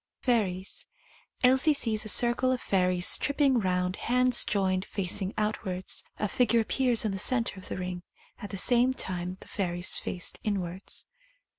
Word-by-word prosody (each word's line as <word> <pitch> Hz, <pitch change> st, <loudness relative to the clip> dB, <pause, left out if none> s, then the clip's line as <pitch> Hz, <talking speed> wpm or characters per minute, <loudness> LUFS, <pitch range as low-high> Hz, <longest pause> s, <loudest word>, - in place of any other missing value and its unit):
Fairies. 195 Hz, -7 st, -1 dB, 0.6 s
Elsie 265 Hz, +4 st, +5 dB
sees 220 Hz, -6 st, 0 dB
a -, -, -1 dB
circle 240 Hz, +3 st, +3 dB
of 255 Hz, -, -1 dB
fairies 180 Hz, -3 st, +2 dB
trip 285 Hz, -, -2 dB
ping 275 Hz, -4 st, +3 dB
round, 180 Hz, -1 st, -1 dB
hands 250 Hz, 0 st, +3 dB
joined, 190 Hz, -2 st, 0 dB
facing 195 Hz, 0 st, -1 dB
outwards. 190 Hz, -3 st, -2 dB
A 210 Hz, -, -1 dB
figure 235 Hz, +2 st, +2 dB
appears 240 Hz, 0 st, +1 dB
in 215 Hz, -, 0 dB
the 195 Hz, -, -4 dB
centre 230 Hz, -2 st, +1 dB
of 185 Hz, -, -7 dB
the -, -, -5 dB
ring, 180 Hz, -1 st, -5 dB, 0.4 s
at 205 Hz, -, -8 dB
the 195 Hz, -, -6 dB
same 245 Hz, +5 st, +3 dB
time 180 Hz, -2 st, -4 dB
the -, -, -13 dB
fairies 175 Hz, -2 st, 0 dB
faced 175 Hz, -, -3 dB
inwards. 190 Hz, -2 st, -3 dB
205 Hz, 160 wpm, -28 LUFS, 185-245 Hz, 0.6 s, Elsie